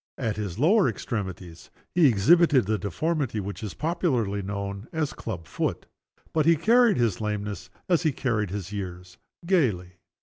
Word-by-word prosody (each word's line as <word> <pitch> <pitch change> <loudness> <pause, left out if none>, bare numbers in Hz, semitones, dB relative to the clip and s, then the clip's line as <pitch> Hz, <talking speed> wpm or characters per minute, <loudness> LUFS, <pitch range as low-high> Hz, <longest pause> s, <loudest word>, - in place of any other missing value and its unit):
At 115 -5 -2
his 100 -5 -4
lower 185 - +4
extremities, 95 -6 -6 0.2
he 170 -4 +5
exhibited 135 - +4
the 110 +1 0
deformity 135 - -1
which 100 +3 -5
is 105 -4 -6
popularly 130 - 0
known 100 +2 -5
as 160 -3 -1
"a - - -12
club 90 -8 -6
foot." 75 - -3 0.5
But 155 -1 +2
he 165 - +6
carried 230 +6 +4
his 115 -5 0
lameness, 105 -1 -4 0.2
as 175 -3 +3
he 160 -3 +2
carried 115 -7 -1
his 100 0 -5
years, 90 -2 -7 0.3
gayly. 100 - 0
110 Hz, 160 wpm, -26 LUFS, 100-155 Hz, 0.5 s, he